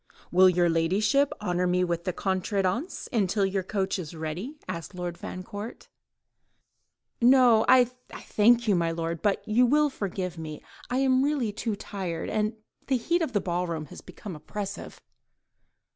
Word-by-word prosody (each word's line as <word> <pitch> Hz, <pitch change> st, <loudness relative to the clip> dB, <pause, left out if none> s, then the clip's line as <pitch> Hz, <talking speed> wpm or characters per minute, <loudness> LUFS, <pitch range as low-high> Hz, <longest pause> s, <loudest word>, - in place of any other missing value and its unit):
"Will 185 Hz, +1 st, +7 dB
your 175 Hz, -1 st, +3 dB
ladyship 200 Hz, +12 st, +2 dB
honour 180 Hz, -2 st, 0 dB
me 180 Hz, 0 st, +2 dB
with 170 Hz, -1 st, -2 dB
the 185 Hz, -, 0 dB
contredanse 195 Hz, -, -1 dB
until 200 Hz, -2 st, +2 dB
your 195 Hz, 0 st, 0 dB
coach 190 Hz, 0 st, -2 dB
is 165 Hz, -2 st, -7 dB
ready?" 165 Hz, -, -5 dB
asked 180 Hz, 0 st, -6 dB
Lord 175 Hz, -1 st, -4 dB
Fancourt. 205 Hz, +5 st, -8 dB, 1.3 s
"No, 245 Hz, -2 st, +6 dB
I 255 Hz, -1 st, +7 dB
thank 240 Hz, -1 st, +1 dB
you, 205 Hz, -, +4 dB
my 170 Hz, -2 st, +1 dB
lord, 165 Hz, 0 st, -3 dB
but—and 210 Hz, +1 st, 0 dB
you 250 Hz, +1 st, +6 dB
will 300 Hz, +2 st, +3 dB
forgive 185 Hz, -6 st, -4 dB
me—I 160 Hz, -, -5 dB
really 265 Hz, -1 st, +2 dB
am 205 Hz, -, -8 dB
too 220 Hz, -1 st, -2 dB
tired, 185 Hz, -5 st, -5 dB
and 215 Hz, +1 st, 0 dB, 0.3 s
the 265 Hz, -, +2 dB
heat 340 Hz, +9 st, 0 dB
in 320 Hz, -, 0 dB
the 210 Hz, -, +1 dB
ball 180 Hz, 0 st, -1 dB
room 160 Hz, -2 st, -3 dB
has -, -, -10 dB
become 195 Hz, -5 st, -9 dB
oppressive." 200 Hz, +6 st, -6 dB
195 Hz, 155 wpm, -27 LUFS, 175-235 Hz, 1.3 s, Will